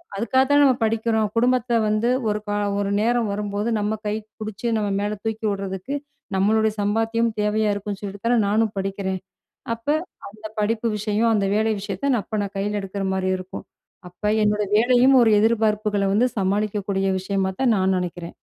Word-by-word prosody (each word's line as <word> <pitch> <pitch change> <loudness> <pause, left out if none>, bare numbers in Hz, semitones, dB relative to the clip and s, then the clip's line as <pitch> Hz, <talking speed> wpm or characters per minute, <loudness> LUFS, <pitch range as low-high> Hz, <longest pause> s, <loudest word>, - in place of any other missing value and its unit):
அதுக்காக 240 +6 +2
தான 290 0 +5
நம்ம 265 -3 +5
படிக்கிறோம். 220 0 +1
குடும்பத்த 245 0 +2
வந்து 215 +3 +1 0.2
ஒரு 210 0 0
காலம் 205 -1 -1
ஒரு 200 - -1
நேரம் 235 0 +1
வரும்போது 205 +1 -2
நம்ம 210 +1 -1
கை 210 - 0 0.3
பிடிச்சு 215 +1 -5
நம்ம 210 -1 -1
மேல 210 +1 -2
தூக்கி 220 0 -3
விடுறதுக்கு 195 +6 -4 0.4
நம்மளுடைய 215 +3 +2
சம்பாத்தியம் 225 +3 +1
தேவையா 210 0 +1
இருக்குன்னு 200 0 -5
சொல்லிட்டு 200 +1 -7
தானே 240 0 +3
நானும் 215 +1 +1
படிக்கிறேன். 195 -1 -2 0.6
அப்ப 230 +4 -15 0.4
அந்த 215 +2 -10
படிப்பு 225 +2 0
விஷயம், 215 +2 +1
அந்த 200 -2 +1
வேலை 220 +1 +2
விஷயத்த 205 +7 -2
நான் 225 -5 +1
அப்ப 215 +3 -4
நான் 200 0 -5
கையில 205 +1 -1
எடுக்கிறமாரி 190 -1 -2
இருக்கும். 185 0 -8 0.4
அப்ப 180 +4 -20 0.2
என்னோட 210 0 +1
வேலையும் 250 +4 +5
ஒரு 225 - +4
எதிர்பார்ப்புகள 210 -2 +1
வந்து 240 +5 +3
சமாளிக்கக்கூடிய 200 0 0
விஷயமா 190 0 -1
தான் 245 -4 +3
நான் 190 0 +2
நினைக்கிறேன். 175 -1 -5
210 Hz, 160 wpm, -23 LUFS, 200-225 Hz, 0.6 s, தான